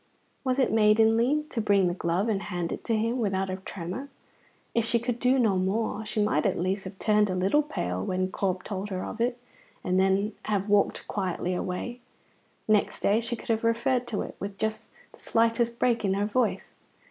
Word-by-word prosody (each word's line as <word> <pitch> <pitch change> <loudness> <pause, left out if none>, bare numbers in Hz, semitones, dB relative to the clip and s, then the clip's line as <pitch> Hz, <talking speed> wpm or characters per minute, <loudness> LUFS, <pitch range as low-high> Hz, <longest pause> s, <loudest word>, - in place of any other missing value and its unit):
Was 255 -1 0
it 270 - +2
maidenly 225 +6 +4
to 230 - -1
bring 200 -3 +3
the 175 - 0
glove 175 +3 0
and 205 -3 0
hand 175 -4 -3
it - - -5
to 230 - +1
him 230 +3 0
without 195 -3 0
a 185 - -3
tremor? 190 +8 -6 0.6
If 230 - +2
she 230 +1 +1
could 240 0 -2
do 255 +2 +3
no 220 -7 +3
more, 215 +3 -1
she 215 - -2
might 155 -8 +2
at - - 0
least 190 +3 -1
have 195 - -8
turned 210 0 +3
a 185 - -1
little 190 +11 +3
pale 90 - -3
when 185 - -1
Corp 185 -2 -1
told 200 0 -4
her 185 -2 -3
of 230 - -5
it, 240 +1 +1 0.5
and 185 +1 +1
then 195 +3 +2
have 205 -2 0
walked 205 0 +2
quietly 185 -2 -2
away. 185 +7 -3 0.7
Next 215 -1 +2
day 210 +3 +3
she 235 +1 -2
could - - -12
have 225 0 +1
referred 240 +2 +1
to 215 - -2
it, - - -8
with 200 0 -5
just 220 0 -2 0.2
the - - -17
slightest 230 +1 +1
break 235 -2 +1
in 195 -1 +1
her 200 +1 +1
voice. 230 +4 0
210 Hz, 205 wpm, -27 LUFS, 190-230 Hz, 0.7 s, maidenly